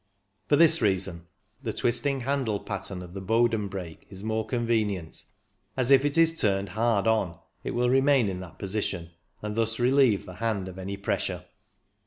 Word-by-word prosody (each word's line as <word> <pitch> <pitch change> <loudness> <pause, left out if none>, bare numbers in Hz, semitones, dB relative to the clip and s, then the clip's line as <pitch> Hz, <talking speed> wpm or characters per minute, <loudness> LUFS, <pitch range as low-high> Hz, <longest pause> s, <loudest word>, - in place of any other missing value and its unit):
For 145 - +4
this 165 0 +5
reason 95 -5 0 0.3
the 115 -5 -2
twisting 135 +3 0
handle 130 -5 -1
pattern 95 -2 -5
of 90 0 -11
the 100 - -6
Bowden 115 +1 +2
brake 90 -5 -8
is 95 0 -9
more 110 0 -1
convenient, 110 -8 -1 0.5
as 130 0 +2
if 135 0 +7
it 145 +2 0
is 165 0 +4
turned 100 -1 +1
hard 110 -1 +1
on 110 -7 +1 0.3
it - - -4
will 125 +1 +2
remain 135 -1 +4
in 95 -2 -3
that 90 -2 -10
position, 95 -4 -3 0.3
and 105 0 -3
thus 115 0 0
relieve 125 -3 +3
the 90 - -9
hand 105 -5 -1
of 95 0 -9
any 100 +1 -5
pressure. 100 - -2
110 Hz, 175 wpm, -27 LUFS, 95-125 Hz, 0.5 s, if